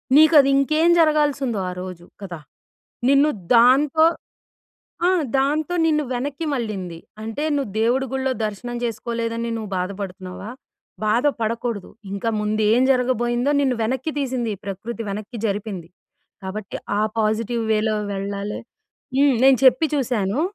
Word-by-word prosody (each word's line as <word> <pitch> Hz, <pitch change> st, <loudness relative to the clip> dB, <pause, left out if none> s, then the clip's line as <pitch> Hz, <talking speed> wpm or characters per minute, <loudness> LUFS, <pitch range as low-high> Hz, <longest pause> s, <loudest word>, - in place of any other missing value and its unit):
నీకది 300 Hz, -2 st, +7 dB
ఇంకేం 310 Hz, +4 st, +3 dB
జరగాల్సుందో 290 Hz, -7 st, +2 dB
ఆ -, -, -4 dB
రోజు 180 Hz, -2 st, -8 dB, 0.2 s
కదా! 175 Hz, -4 st, -6 dB, 0.7 s
నిన్ను 280 Hz, +2 st, +5 dB, 0.3 s
దాంతో 270 Hz, +6 st, +5 dB, 1.0 s
ఆ! -, -, +5 dB, 0.3 s
దాంతో 295 Hz, +5 st, 0 dB
నిన్ను 300 Hz, -2 st, +2 dB
వెనక్కి 280 Hz, +5 st, -3 dB
మళ్లింది. 195 Hz, -8 st, -4 dB, 0.2 s
అంటే 225 Hz, +7 st, -4 dB
నువ్వు 270 Hz, -8 st, -2 dB
దేవుడి 250 Hz, +4 st, +2 dB
గుడిలో 265 Hz, 0 st, 0 dB
దర్శనం 240 Hz, +4 st, -6 dB
జెసుకోలేదని 230 Hz, 0 st, -3 dB
నువ్వు 215 Hz, -3 st, -6 dB
బాధపడుతున్నావా, 190 Hz, +1 st, -6 dB, 0.6 s
బాధ 235 Hz, +7 st, +2 dB
పడకూడదు. 230 Hz, -2 st, -2 dB, 0.2 s
ఇంకా 200 Hz, +3 st, -2 dB
ముందు 215 Hz, +1 st, -1 dB
ఏం 245 Hz, +3 st, +4 dB
జరగబోయిందో 250 Hz, 0 st, +1 dB
నిన్ను 265 Hz, -3 st, +2 dB
వెనక్కి 260 Hz, +7 st, -1 dB
తీసింది 255 Hz, -4 st, -1 dB
ఈ -, -, -29 dB
ప్రకృతి. 220 Hz, +4 st, -5 dB
వెనక్కి 215 Hz, +4 st, -6 dB
జరిపింది. 200 Hz, -4 st, -4 dB, 0.6 s
కాబట్టి 195 Hz, +2 st, -5 dB, 0.2 s
ఆ -, -, +2 dB, 0.2 s
పాజిటివ్ 225 Hz, +2 st, 0 dB
వేలో 215 Hz, 0 st, +1 dB, 0.2 s
వెళ్ళాలి. 200 Hz, +1 st, -4 dB, 0.6 s
హ్మ్. 280 Hz, -2 st, +5 dB
నేచెప్పి 265 Hz, +2 st, +5 dB
చూసాను, 245 Hz, -3 st, 0 dB
235 Hz, 125 wpm, -22 LUFS, 210-270 Hz, 1.0 s, నీకది